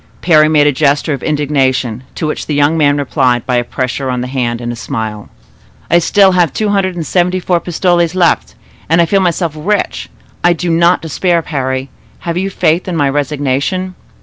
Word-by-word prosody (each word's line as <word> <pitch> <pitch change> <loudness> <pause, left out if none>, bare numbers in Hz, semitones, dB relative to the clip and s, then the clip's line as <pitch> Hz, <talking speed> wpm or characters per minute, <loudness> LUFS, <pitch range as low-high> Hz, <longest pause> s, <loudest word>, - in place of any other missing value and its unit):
Parry 155 -3 +5
made 150 -2 +4
a 145 - +4
gesture 145 +2 +1
of 140 - -5
indignation, 135 -6 0
to - - -3
which 155 - -3
the 150 - -1
young 145 +2 +2
man 145 -2 +2
replied 130 -4 0
by 125 -1 0
a 120 - +1
pressure 130 +2 -3
of 125 -1 -1
the - - -3
hand 125 -3 -2
and 120 0 -4
a - - -5
smile. 110 -2 -5 0.6
"I - - +1
have 170 -1 +4
still 195 +1 +4
two 180 +4 +1
hundred 195 -3 0
and 165 -2 -4
seventy 180 +3 +1
four 180 -1 0
pistoles 175 0 0
left 175 -3 +1 0.3
and 165 +2 +3
I 170 - +5
feel 195 +4 +2
myself 170 -3 0
rich. 200 +7 -2 0.3
I 175 - +5
do 170 +1 -2
not 170 +2 +3
despair, 170 +2 0
Parry; 130 -3 -3 0.3
have 170 -1 -3
you 190 +2 -1
faith 175 -1 0
in 180 - -3
my 145 -3 +1
resignation?" 145 +6 -1
155 Hz, 200 wpm, -14 LUFS, 135-175 Hz, 0.6 s, Parry